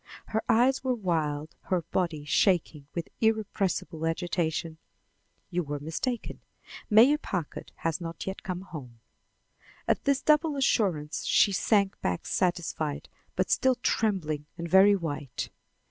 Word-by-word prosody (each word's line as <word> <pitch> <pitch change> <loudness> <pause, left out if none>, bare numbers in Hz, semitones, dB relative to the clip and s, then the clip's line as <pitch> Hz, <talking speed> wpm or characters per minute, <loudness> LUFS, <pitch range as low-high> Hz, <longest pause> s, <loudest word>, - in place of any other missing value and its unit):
Her 220 - 0
eyes 255 +4 +4
were 255 -1 +1
wild, 155 -7 -2
her 180 -3 0
body 165 -3 -2
shaking 155 -3 +1
with 170 -1 -3
irrepressible 200 -7 0
agitation. 165 -1 -2 0.7
"You 180 0 0
were 145 -2 -4
mistaken. 165 - -3 0.5
Mayor 245 +8 +6
Packard 180 - -5
has 165 +1 -2
not 165 -1 -6
yet 190 0 -5
come 185 -1 -4
home." 135 -11 -10 0.9
At - - +1
this 280 -1 +3
double 305 0 +3
assurance, 185 - +1
she 205 - +4
sank 200 0 +1
back 90 -1 -2
satisfied, 170 -4 -1 0.3
but - - 0
still 260 -1 +3
trembling 180 -11 -1
and 170 - -4
very 190 +3 +6
white. 150 -7 -4
175 Hz, 130 wpm, -28 LUFS, 155-215 Hz, 0.9 s, Mayor